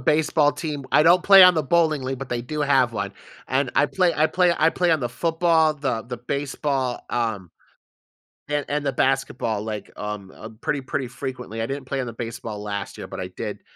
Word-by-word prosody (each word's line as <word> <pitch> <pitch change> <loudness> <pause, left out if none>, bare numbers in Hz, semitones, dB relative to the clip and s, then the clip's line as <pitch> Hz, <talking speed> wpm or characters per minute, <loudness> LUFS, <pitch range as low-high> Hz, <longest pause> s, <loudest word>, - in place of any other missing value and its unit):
baseball 150 +1 +2
team, 150 -4 -5
I - - +6
don't 175 +3 +5
play 195 -1 +9
on 180 -1 +8
the 155 - +1
bowling 155 -1 +2
league, 130 0 -3
but 135 -2 -7
they 120 -1 -2
do 150 +4 -5
have 135 -4 +3
one, 100 -2 -3 0.4
and 130 -1 0
I 145 - +4
play 180 0 +1
I 155 - +3
play 175 +2 +2
I 160 +1 +4
play 175 -1 +1
on 160 - +2
the 120 - -1
football, 165 +1 +2
the 135 -6 -2
the 125 0 -6
baseball, 135 0 -2
um, 110 -7 -2 1.0
and 145 -1 -1
and 145 0 -1
the 135 - 0
basketball, 130 -6 0
like, 105 -1 -6
um, 105 -2 -6
uh, 110 - -9
pretty 145 -2 -1
pretty 130 0 -3
frequently. 125 -3 -6
I - - 0
didn't 135 +1 -5
play 135 +1 -3
on 125 - -2
the 115 - -6
baseball 115 -2 -6
last 100 -2 -5
year, - - -7
but - - -8
I - - -4
did, - - -5
135 Hz, 215 wpm, -23 LUFS, 120-155 Hz, 1.0 s, play